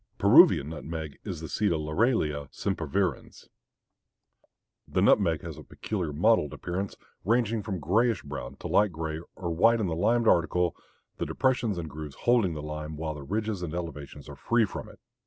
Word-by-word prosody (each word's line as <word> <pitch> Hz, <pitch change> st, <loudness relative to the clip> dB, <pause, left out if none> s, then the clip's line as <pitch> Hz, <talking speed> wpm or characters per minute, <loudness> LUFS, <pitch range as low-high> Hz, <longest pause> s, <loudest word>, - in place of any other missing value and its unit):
Peruvian 70 Hz, -, +6 dB
nutmeg 80 Hz, -1 st, -6 dB
is -, -, -5 dB
the -, -, -5 dB
seed 105 Hz, -2 st, 0 dB
of 80 Hz, -2 st, 0 dB
Laurelia 75 Hz, -, 0 dB
sempervirens. 95 Hz, -8 st, -2 dB, 1.4 s
The -, -, -1 dB
nutmeg -, -, +3 dB
has -, -, -7 dB
a -, -, -10 dB
peculiar 90 Hz, -8 st, -4 dB
mottled 80 Hz, 0 st, +2 dB
appearance, 95 Hz, +3 st, -4 dB, 0.3 s
ranging 115 Hz, +1 st, +1 dB
from 95 Hz, -3 st, -4 dB
grayish 110 Hz, +8 st, +1 dB
brown 70 Hz, -3 st, -7 dB
to -, -, -7 dB
light 105 Hz, -1 st, +3 dB
gray 80 Hz, -1 st, -4 dB
or 85 Hz, -2 st, -4 dB
white 115 Hz, +7 st, +4 dB
in 110 Hz, -, 0 dB
the 85 Hz, -3 st, -1 dB
limed 115 Hz, +7 st, +2 dB
article, 90 Hz, -1 st, +2 dB, 0.4 s
the -, -, -3 dB
depressions 125 Hz, -6 st, 0 dB
and 85 Hz, -2 st, -4 dB
grooves 75 Hz, -1 st, -8 dB
holding 115 Hz, -9 st, +2 dB
the 75 Hz, -, -6 dB
lime 75 Hz, 0 st, -6 dB
while 80 Hz, 0 st, -3 dB
the 75 Hz, -, -8 dB
ridges 105 Hz, +5 st, -2 dB
and 85 Hz, -2 st, -4 dB
elevations 75 Hz, -4 st, -7 dB
are 75 Hz, -, -9 dB
free 115 Hz, -, +2 dB
from 100 Hz, -, -7 dB
it. -, -, -15 dB
85 Hz, 175 wpm, -28 LUFS, 75-110 Hz, 1.4 s, Peruvian